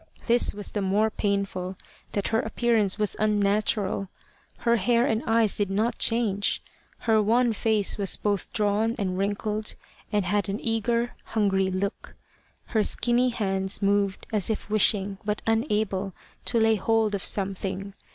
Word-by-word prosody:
This 240 -2 +2
was 205 -1 -5
the 205 - -2
more 205 +3 +2
painful 200 -3 -2 0.4
that 200 - -1
her 225 - +2
appearance 220 -3 +1
was 210 -2 +1
unnatural; 205 -1 +1 0.5
for - - -26
her 235 0 +4
hair 235 +4 +2
and 225 -4 +1
eyes 225 -2 +3
did 205 -2 -1
not 215 +5 0
change. 215 -4 +1 0.4
Her 220 -2 +3
wan 230 +3 +3
face 215 -1 0
was 195 -2 0
both 205 -2 -1
drawn 215 +1 +1
and 190 -4 -1
wrinkled, 205 +2 -2 0.4
and 205 -3 +1
had 205 +2 0
an 200 +3 -2
eager 235 +1 0
hungry 195 -3 +1
look. 190 +2 -4 0.5
Her 220 -2 +1
skinny 240 +4 +2
hands 195 -4 -1
moved 200 -1 +1
as 210 -2 0
if 215 -1 -3
wishing, 200 -2 +2
but 210 0 -2
unable, 210 -4 0 0.3
to 235 - +2
lay 220 0 +4
hold 220 +1 +1
of 200 - -2
something. 195 0 -2
210 Hz, 150 wpm, -26 LUFS, 195-225 Hz, 0.5 s, her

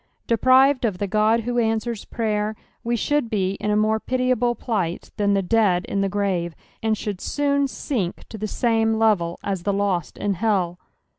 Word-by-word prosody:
Deprived 255 +4 +4
of 210 -6 0
the 205 - -1
God 215 +3 +2
who 240 +1 -1
answers 225 -1 -1
praver, 215 -1 -1 0.3
we 235 +1 0
should 290 +1 0
be 190 -4 0
in 210 - -2
a 210 - +2
more 215 +1 +2
pitiable 250 -1 0
plight 190 -10 -3
than 200 -1 +2
the 195 - +1
dead 190 -3 +2
in 200 - -1
the 195 - +1
grave, 185 -4 -1 0.3
and 220 -1 +1
should 200 -3 -4
soon 280 -1 +1
sink 225 -9 -3
to 220 - -8
the 215 - -2
same 225 0 +1
level 205 -7 +1
u 200 - +1
tbe 180 +1 -11
lost 190 -5 -1
in 205 -1 -1
hell. 185 -3 0
215 Hz, 180 wpm, -23 LUFS, 195-235 Hz, 0.3 s, Deprived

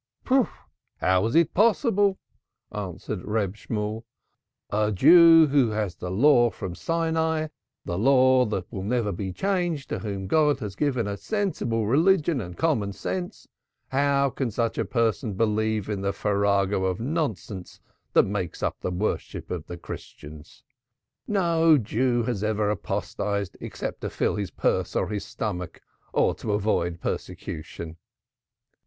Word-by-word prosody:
"How 95 0 +3
is 115 - -2
it 165 -1 +4
possible?" 205 -2 +3 0.5
answered 95 -1 -5
Reb 105 -3 -1
Shemuel. 105 +1 -4 0.7
"A 105 +1 +1
Jew 165 - +8
who 140 -5 +3
has 105 -4 -2
the 90 - -6
Law 120 +4 +5
from 95 -5 -6
Sinai, 160 - 0 0.4
the 85 +1 -2
Law 130 +1 +5
that 105 - -2
will 95 - -4
never 110 +1 0
be 95 +1 -4
changed, 175 - -1
to - - -2
whom 100 -3 -4
God 150 +7 +3
has 100 -2 -5
given 130 -3 0
a 100 0 -3
sensible 155 - -1
religion 160 - +3
and 90 -3 -8
common 115 -12 0
sense, 180 - -5 0.4
how 140 0 +2
can 135 -2 -2
such 115 +1 -1
a - - +1
person 115 -1 0
believe 110 -1 0
in 105 -2 -3
the 100 0 -1
farrago 100 -1 +1
of 95 -1 -1
nonsense 115 - -3 0.3
that - - +6
makes 95 -4 -4
up - - -1
the - - -2
worship 90 +4 -3
of 85 -3 -4
the 85 - -7
Christians! 75 -2 -10 0.6
No 165 -5 +4
Jew 120 +1 0
has 115 -4 -2
ever 105 -1 +1
apostatized 100 0 -3
except - - -5
to - - -3
fill - - 0
his 100 -3 -3
purse - - -1
or 95 - 0
his 105 -2 -3
stomach 90 -6 -5 0.3
or - - +2
to 105 - -3
avoid 90 -5 0
persecution. 80 +1 -5
110 Hz, 145 wpm, -25 LUFS, 100-145 Hz, 0.7 s, Jew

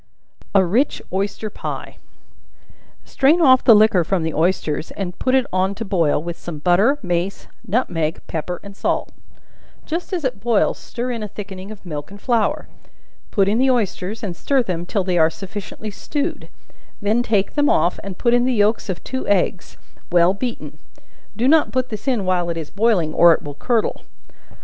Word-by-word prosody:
A 190 -1 +6
Rich 235 +11 +1
Oyster 200 +2 -2
Pie. - - -6 1.1
Strain 290 +6 +3
off 260 -6 +6
the 230 - +8
liquor 210 -4 +5
from 175 0 0
the 160 -1 -2
oysters, 160 -2 0
and 185 -2 -6
put 260 0 +2
it 260 -2 +3
on 190 +2 +1
to 225 - -5
boil, 165 -6 +1
with 170 0 -6
some 170 -3 -7
butter, 185 - +3
mace, 175 +1 -2 0.2
nutmeg, 170 -8 0
pepper 170 +2 -4
and 200 -1 -11
salt; - - -1 0.7
just 335 +4 -4
as 355 -4 -2
it 260 -2 -2
boils, 230 -3 +1
stir 245 +1 -4
in 235 -2 -4
a 210 - -3
thickening 195 -2 -8
of 215 -3 -11
milk 150 -4 -6
and 200 +1 -11
flour; 230 -2 0 0.6
put 195 -2 +2
in 215 +4 +2
the 265 +1 +3
oysters, 215 -3 -1
and 185 -5 -3
stir 270 +7 +1
them 175 -4 -4
till 200 0 0
they 180 -2 +1
are 160 0 +5
sufficiently 205 +4 -7
stewed; 295 - -4 0.5
then 215 +3 +1
take 210 -4 0
them 290 -1 +2
off, 175 - +2
and 195 -2 -7
put 235 -1 +2
in 245 0 +4
the 255 -1 +1
yelks 210 0 +1
of 180 - -4
two 260 0 -4
eggs, 185 -2 0 0.3
well 175 +1 +5
beaten; 235 +4 -5 0.6
do 240 +3 +1
not 315 +2 +4
put 255 0 -1
this 215 +3 -7
in 240 -7 +1
while 180 -2 +1
it 170 - -2
is 160 -2 -6
boiling, 200 -7 +1
or 170 0 +7
it - - -3
will 145 - -6
curdle. 225 - -1
200 Hz, 185 wpm, -20 LUFS, 175-240 Hz, 1.1 s, the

